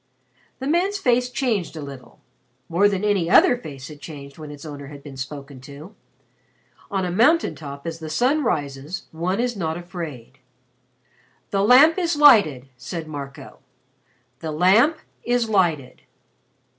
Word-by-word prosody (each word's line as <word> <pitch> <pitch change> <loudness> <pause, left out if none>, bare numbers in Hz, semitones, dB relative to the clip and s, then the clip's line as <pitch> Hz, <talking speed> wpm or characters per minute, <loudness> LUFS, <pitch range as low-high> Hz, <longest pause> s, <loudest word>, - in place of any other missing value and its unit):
The 265 - -6
man's 355 +7 +1
face 250 -7 +1
changed 240 -9 -1
a - - -5
little 140 -2 -11 0.5
more 185 +5 +3
than 195 -1 -2
any 200 -5 +1
other 245 - +6
face 140 - -9
had 150 -2 -12
changed 140 -2 -10
when 155 -1 -8
its 145 +2 -10
owner 145 -2 -8
had 140 -1 -11
been 140 -3 -10
spoken 135 0 -8
to. 145 +8 -12 1.0
On 195 -2 -1
a 180 - -2
mountain 290 - +3
top 140 -2 -9
as 165 0 -5
the 160 -1 -7
sun 260 - +1
rises 145 - -3
one 180 +5 -2
is 245 0 -1
not 160 -4 -2
afraid. 165 -8 -8 1.1
"The 195 - +1
Lamp 275 - +6
is 345 -2 0
lighted," 205 - +5
said 160 +6 -6
Marco. 140 -2 -9 0.8
"The 160 -1 -5
Lamp 195 - +4 0.3
is 245 -1 +1
lighted." 165 -10 0
170 Hz, 150 wpm, -22 LUFS, 145-235 Hz, 1.1 s, other